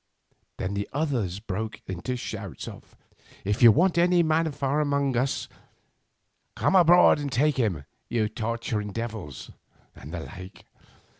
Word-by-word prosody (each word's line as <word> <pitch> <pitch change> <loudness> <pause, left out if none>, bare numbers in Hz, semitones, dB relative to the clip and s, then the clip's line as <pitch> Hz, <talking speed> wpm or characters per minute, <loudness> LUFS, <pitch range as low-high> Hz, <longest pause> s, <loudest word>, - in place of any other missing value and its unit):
"Then 95 +2 -3
the 100 0 -3
others 125 - -1
broke 110 +1 -5
into 95 +7 -4
shouts 125 - -6
of: - - -12 0.5
"'If 105 +4 -1
you 120 -2 +10
want 170 - +3
any 175 0 +4
man 160 0 +1
from 140 +1 -1
among 140 -3 +1
us, 130 +3 0 1.1
come - - +1
aboard 175 -3 +6
and 145 -2 -4
take 145 +2 +2
him, 95 - 0 0.2
you 110 -3 +1
torturing 110 -2 -3
devils,' 110 - -6 0.4
and 75 - -11
the 85 -1 -4
like. 90 +3 -11
120 Hz, 140 wpm, -26 LUFS, 100-145 Hz, 1.1 s, you